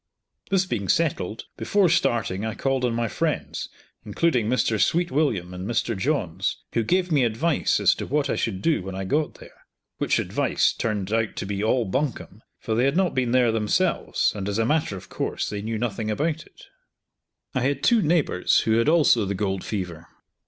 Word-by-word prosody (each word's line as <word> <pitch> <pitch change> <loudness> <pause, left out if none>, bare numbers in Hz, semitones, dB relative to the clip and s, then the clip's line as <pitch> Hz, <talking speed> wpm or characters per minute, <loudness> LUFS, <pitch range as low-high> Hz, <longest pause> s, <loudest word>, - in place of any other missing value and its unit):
This 190 -1 +2
being 110 - -3
settled, 115 - 0
before 200 -2 +2
starting 115 - +1
I 110 0 -3
called 135 -1 -1
on 120 -2 0
my 120 0 0
friends, - - -2 0.3
including 115 +1 +1
Mr. 115 -4 +1
Sweetwilliam 140 - +1
and 90 +2 -6
Mr. 115 -1 0
Johns, 95 - -1 0.2
who 115 - +2
gave 180 - +1
me 145 -4 +3
advice 125 +8 +1
as - - +5
to - - -6
what 145 0 0
I - - 0
should 95 -4 -2
do 165 -9 +2
when 95 +1 -6
I 95 - -3
got 145 +10 -1
there: - - -16 0.3
which - - +1
advice - - +1
turned 105 -2 -2
out 115 -1 0
to - - -4
be 100 +1 -3
all 120 +2 +2
bunkum, 120 -1 -3 0.2
for 110 - -3
they 120 +3 +2
had 140 +5 +1
not 190 -2 +2
been 130 -2 0
there 125 -2 +4
themselves, 110 -2 +1
and, 100 -1 -3
as 100 - -2
a 115 - +2
matter 150 -7 0
of 95 0 -11
course, - - -3
they 105 -1 -4
knew 110 +1 -3
nothing 110 -1 -2
about 155 +8 -1
it. - - -19 0.9
I 130 - 0
had 135 +2 -1
two 235 -2 +4
neighbours 155 - +2
who 110 0 +2
had 115 - +2
also 150 -9 +4
the 100 +1 -2
gold 95 -1 -2
fever. 90 -5 -5
115 Hz, 195 wpm, -24 LUFS, 100-145 Hz, 0.9 s, as